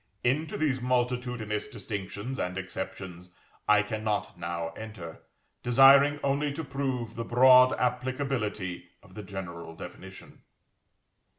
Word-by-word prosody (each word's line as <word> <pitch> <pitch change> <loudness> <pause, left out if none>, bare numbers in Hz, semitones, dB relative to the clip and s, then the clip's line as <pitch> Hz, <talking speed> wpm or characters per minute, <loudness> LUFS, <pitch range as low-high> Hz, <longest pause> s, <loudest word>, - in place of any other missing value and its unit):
Into 150 +6 0
these 135 -4 0
multitudinous 125 -3 -1
distinctions 105 +1 -5
and 90 +1 -2
exceptions 95 -1 -7 0.3
I 105 0 +5
cannot 110 -1 -2
now 85 -1 -3
enter, 90 -3 -9 0.4
desiring 140 +4 +6
only 140 +1 +1
to 160 +3 -4
prove 130 -5 -3
the 115 - -4
broad 125 +2 +7
applicability 125 -7 -2
of - - -18
the 105 - -7
general 90 -4 -7
definition. 95 +2 -11
115 Hz, 110 wpm, -28 LUFS, 95-130 Hz, 0.4 s, broad